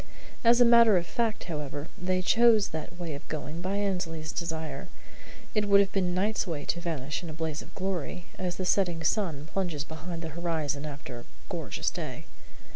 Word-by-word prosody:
As 235 +1 +6
a 245 - +8
matter 235 -4 +7
of 170 - 0
fact, 225 +3 -1
however, 150 -2 -4
they 185 +1 0
chose 225 0 +5
that 160 +2 -6
way 170 -3 -4
of 140 - -8
going 155 +2 -4
by 190 +2 -1
Annesley's 180 -6 -1
desire. 160 -4 -3 0.7
It 210 -1 +2
would 200 0 +7
have 200 -1 +3
been 180 -2 +1
Knight's 205 +2 +1
way 150 -4 -3
to 170 - -1
vanish 155 -4 -2
in 170 - -6
a - - -5
blaze 160 -1 -3
of 170 - -14
glory, 180 -2 -3
as 180 -1 -1
the 185 - -3
setting 175 -4 +2
sun 160 -5 +1
plunges 175 -7 -1
behind 165 +2 -6
the 165 - -3
horizon 155 -3 -2
after 140 -4 -7
a 120 - -12 0.2
gorgeous - - -2
day. - - -5
175 Hz, 190 wpm, -29 LUFS, 155-195 Hz, 0.7 s, a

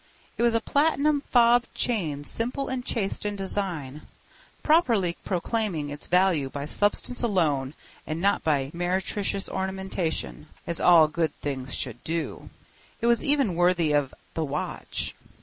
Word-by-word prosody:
It - - -4
was 235 -1 +3
a - - +4
platinum 290 +1 +2
fob 240 -2 +4
chain 160 - -1
simple 245 - -1
and 255 -1 -2
chaste 215 -6 -2
in 205 0 -2
design, 180 -8 -4 0.6
properly 230 - +3
proclaiming 185 -5 -1
its 145 - -7
value 180 -6 +3
by 140 +1 -5
substance 205 +8 +1
alone 155 - +1 0.3
and 155 +1 -3
not 200 +3 +2
by 140 -3 +1
meretricious 190 +3 -1
ornamentation—as 185 - -4
all 165 -3 +7
good 160 -1 -1
things 135 -2 -4
should 120 -2 -5
do. 165 0 -4 0.5
It 235 - -2
was 235 -1 +3
even 280 -9 +2
worthy 175 -2 +2
of 145 -3 +1 0.2
The 160 - -1
Watch. 150 0 -4
180 Hz, 135 wpm, -26 LUFS, 150-230 Hz, 0.6 s, all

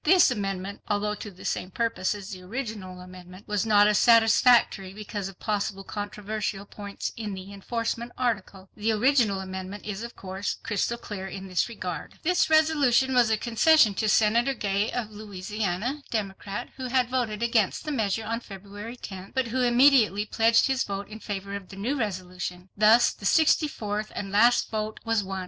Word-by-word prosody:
This 350 -3 +6
amendment, 195 -3 -3
although 210 0 0
to 210 - -7
the 185 -2 -13
same 185 - -2
purpose 220 -2 -1
as 200 0 -8
the 185 -2 -8
original 200 -3 -6
amendment, 180 +1 -12
was 210 +1 -1
not 205 -1 +6
as 210 0 +3
satisfactory 225 -4 +4
because 205 -2 -5
of 195 -1 -11
possible 200 -2 -2
controversial 205 0 -4
points 200 0 -6
in 210 -3 -5
the 190 +1 -9
enforcement 230 +3 -3
article. 200 -6 -3
The 215 +2 0
original 220 -4 +2
amendment 190 +1 -7
is 210 0 -4
of 235 0 -7
course 190 +1 -4
crystal 225 +3 -1
clear 195 -4 -6
in 195 0 -7
this 185 +4 0
regard. 185 -7 -6
This 360 0 +2
resolution 290 -5 +3
was 245 -3 +4
a 220 - +2
concession 235 +1 +4
to 215 +2 0
Senator 230 +5 +3
Gay 200 -1 0
of 230 -3 -3
Louisiana, 210 +4 -3
Democrat, 205 0 -4
who 260 -1 -4
had 250 -1 +2
voted 235 -4 -1
against 230 - +1
the 305 - -2
measure 220 -4 -1
on 230 +1 -2
February 205 +2 -9
10th, 190 -2 -9
but 260 -3 0
who 255 +3 0
immediately 240 -4 +4
pledged 225 +2 +3
his 265 -1 +1
vote 200 0 -5
in 215 +1 -9
favor 200 -2 -5
of 195 -2 -8
the - - -10
new 225 +9 -2
resolution. 185 -5 -4
Thus 220 +3 +5
the 195 - -4
sixty 315 +2 +4
fourth 215 -5 -4
and 195 -1 -4
last 235 +4 +4
vote 215 0 -3
was 225 -2 +1
won. 190 0 -4
210 Hz, 180 wpm, -26 LUFS, 195-235 Hz, -, This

